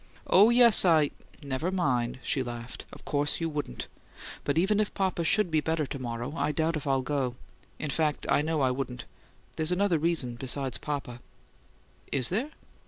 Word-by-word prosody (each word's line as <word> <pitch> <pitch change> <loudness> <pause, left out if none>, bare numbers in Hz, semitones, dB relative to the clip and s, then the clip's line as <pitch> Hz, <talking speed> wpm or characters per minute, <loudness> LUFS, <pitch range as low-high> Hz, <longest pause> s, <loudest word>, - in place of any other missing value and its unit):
"Oh, 205 +4 +6
yes, 240 -2 +8
I 160 -5 +4 0.2
" - - -22
"Never 140 +5 -2
mind!" 130 -10 0
she 135 - 0
laughed. 120 -1 -7
"Of - - -13
course 145 0 -1
you 165 - -1
wouldn't. 145 - -5 0.6
But 145 - -1
even 195 +5 +2
if 215 - 0
papa 190 -3 -1
should 195 +2 +1
be 155 -1 +2
better 160 -1 -1
to 140 - -6
morrow, 120 +2 -5
I 150 - 0
doubt 160 +2 0
if 150 -1 -5
I'd 135 -1 +1
go. 135 -4 -1 0.4
In 155 - -4
fact, 150 -1 -1
I - - +3
know 155 0 -1
I 130 -1 +2
wouldn't. 125 -2 -5 0.5
There's 160 +1 -1
another 180 -2 +1
reason 150 -7 -1
besides 130 0 -2
papa." 140 -5 -5 0.9
"Is 130 -3 +3
there?" 230 +11 -1
150 Hz, 180 wpm, -28 LUFS, 130-170 Hz, 0.9 s, yes